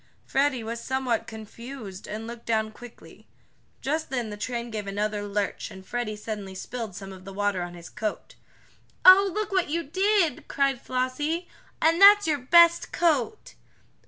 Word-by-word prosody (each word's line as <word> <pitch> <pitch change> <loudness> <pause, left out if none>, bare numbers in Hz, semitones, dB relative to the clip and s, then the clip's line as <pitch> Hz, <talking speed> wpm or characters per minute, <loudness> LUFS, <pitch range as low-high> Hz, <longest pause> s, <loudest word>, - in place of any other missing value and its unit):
Freddie 270 -3 +1
was 230 +1 -5
somewhat 255 -3 -1
confused, 220 -2 -9
and 220 +1 -5
looked 235 0 -9
down 220 -1 0
quickly. 240 +2 -14 0.5
Just 310 +3 -2
then 245 -5 -3
the - - -5
train 235 +2 -4
gave 210 -2 -5
another 205 +1 -2
lurch 200 0 -2
and 190 0 -12
Freddie 240 0 -3
suddenly 210 -2 -6
spilled 225 0 -6
some 195 0 -8
of 185 -1 -12
the 195 - -9
water 200 -1 -1
on 175 0 -6
his 170 -1 -10
coat. 215 -1 -4 0.7
"Oh, 390 +2 +9
look 425 +2 -3
what 375 -5 +1
you 335 +2 -1
did!" 375 -1 +1
cried 275 -3 0
Flossie. 290 +7 -2 0.3
"And 330 +3 +3
that's 410 +1 +9
your 300 -3 +1
best 340 +6 +5
coat!" 330 - 0
240 Hz, 160 wpm, -26 LUFS, 210-310 Hz, 0.7 s, Oh